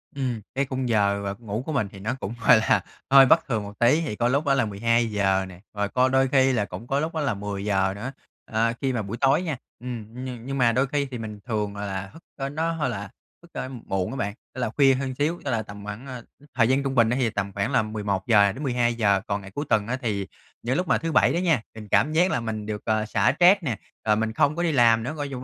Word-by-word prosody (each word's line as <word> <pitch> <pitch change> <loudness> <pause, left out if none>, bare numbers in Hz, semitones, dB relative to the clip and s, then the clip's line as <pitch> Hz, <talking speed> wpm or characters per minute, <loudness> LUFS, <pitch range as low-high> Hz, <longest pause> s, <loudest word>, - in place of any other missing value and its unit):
Ừm, 125 -5 -2
cái 140 +1 +1
khung 130 -2 -3
giờ, 100 -2 +2
ờ, 100 0 -3
ngủ 110 +1 -4
của 155 - -3
mình 110 -7 0
thì 95 - -11
nó 110 +6 -2
cũng, 105 - -4
gọi - - +9
là, 110 - +2 0.3
hơi 135 0 +8
bất 160 +5 +4
thường 110 -5 -1
một 100 0 -10
tí 130 +8 +4
thì 140 -10 -3
có 120 - +1
lúc 140 +4 +1
đó 140 - +3
là 130 -4 +2
12:00 105 -3 +1
nè, 90 -1 -12
rồi 105 -1 -1
có 130 +1 +3
đôi 135 0 +3
khi 130 0 +4
là 105 -4 +1
cũng 95 +6 -9
có 140 +1 +1
lúc 160 +2 -2
đó 155 - 0
là 140 -6 0
10:00 100 -1 -1
nữa. 125 +7 -5 0.4
Ờ, 115 +1 +1
khi 135 -1 0
mà 115 - -1
buổi 105 +4 -5
tối 140 +5 +4
nha 155 -7 -3 0.2
ừm, 120 -2 -7
ừm, 125 -2 -6
nhưng 135 0 -3
mà 120 -2 +4
đôi 130 +3 +1
khi 145 +1 0
thì 125 - -4
mình 110 -2 -7
thường 105 -3 -2
là 100 -1 -4
thức 165 +2 -15
ơ, 135 0 -3
nó 160 +3 -1
hơi 160 -2 -1
là 100 0 -5 0.3
thức, 170 - -18
a, - - -4 0.2
muộn 95 -1 -1
á - - -5
bạn, 100 -4 -2 0.2
tức 130 - -5
là 115 - 0
khuya 135 +2 +4
hơn 130 0 -2
xíu, 155 +5 -1
tức 135 - -1
là 115 -1 0
tầm 100 0 -10
khoảng 110 +6 -7
à, 125 -2 -7 0.2
ư, 145 - -19
thời 115 -3 +4
gian 135 +1 +2
trung 135 -1 -2
bình 115 -2 +4
thì 125 -1 +1
tầm 100 -2 -3
khoảng 100 +1 -1
là 120 - +3
11:00 105 -1 +2
đến 140 +9 -7
12:00. 120 -6 +2
Còn 100 0 -1
ngày 95 0 -11
cuối 145 +8 -4
tuần 105 -2 +2
á 130 +2 -1
thì 100 -5 -2 0.3
những 125 +3 -1
lúc 180 -1 -1
mà - - +3
thứ 165 0 -3
Bảy 155 - +4
đó - - 0
nha, 165 - +2
mình 105 -1 -9
cảm 155 +2 +3
giác 180 +4 +3
là - - +1
mình 110 -2 -4
được, 105 -1 -4
ờ, 110 -1 +1
xả 105 +3 +2
stress 180 +1 +6
nè, 120 -8 -2 0.3
rồi 105 - +5
mình 110 0 -1
không 145 +6 +2
có 175 - -1
đi 165 - +2
làm 115 -4 +4
nữa, 140 +6 -3
gọi 145 -2 -4
chung 130 -1 -5
120 Hz, 275 wpm, -25 LUFS, 105-135 Hz, 0.4 s, gọi